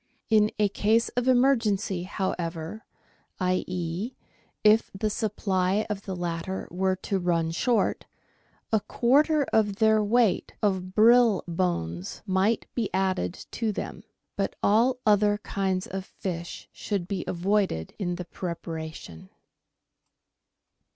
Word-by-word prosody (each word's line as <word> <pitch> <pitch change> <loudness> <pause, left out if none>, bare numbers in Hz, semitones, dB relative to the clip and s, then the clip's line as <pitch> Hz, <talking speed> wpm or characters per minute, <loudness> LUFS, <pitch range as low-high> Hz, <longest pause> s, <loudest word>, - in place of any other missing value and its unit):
In 215 -1 +5
a 210 -1 +3
case 220 +3 +2
of 245 +1 -2
emergency, 230 -8 +2
however, 180 0 -4 0.5
i.e., 185 +3 -2 0.5
if 215 +1 +5
the 215 +2 -1
supply 200 -2 0
of 200 -1 -4
the 190 - -4
latter 175 +1 -4
were 190 +2 +1
to 195 - 0
run 170 -2 0
short, 230 +7 0 0.7
a 220 - +5
quarter 290 +8 +3
of 210 -2 +3
their 220 0 +4
weight 225 -1 +2
of 190 -2 0
brill 230 -1 +5
bones 95 - -2
might 195 +3 +1
be 230 -5 -1
added 185 - -1
to 225 -2 -1
them. 195 -1 -6 0.3
But 195 - -2
all 235 +5 +4
other 205 -1 +4
kinds 190 -2 -2
of 190 0 -5
fish 175 -3 -6
should 195 -5 -3
be 190 -3 -3
avoided 185 - 0
in 175 -3 -1
the 180 0 -6
preparation. 160 - -7
195 Hz, 120 wpm, -27 LUFS, 180-215 Hz, 0.7 s, In